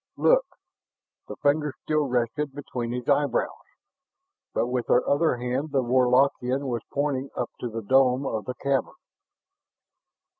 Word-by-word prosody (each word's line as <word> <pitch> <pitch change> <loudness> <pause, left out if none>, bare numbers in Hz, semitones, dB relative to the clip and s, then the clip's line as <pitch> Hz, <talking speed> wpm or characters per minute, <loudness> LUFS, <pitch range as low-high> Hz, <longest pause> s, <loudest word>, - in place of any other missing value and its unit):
"Look!" - - +4 0.8
The - - -7
fingers 145 0 +1
still 155 -2 +1
rested 125 +3 -1
between 125 -4 -4
his 125 0 -4
eyebrows, 145 0 +2 1.0
but - - 0
with 125 0 -2
her 125 - +3
other 145 0 +2
hand 125 +5 -2
the 135 -2 +1
Warlockian 130 +2 +2
was 120 -3 -2
pointing 140 -1 -1
up - - -3
to 120 - -3
the 115 0 -5
dome 130 +3 +3
of 110 -5 -3
the 125 - -4
cavern. 140 0 -1
130 Hz, 140 wpm, -26 LUFS, 125-145 Hz, 1.0 s, Look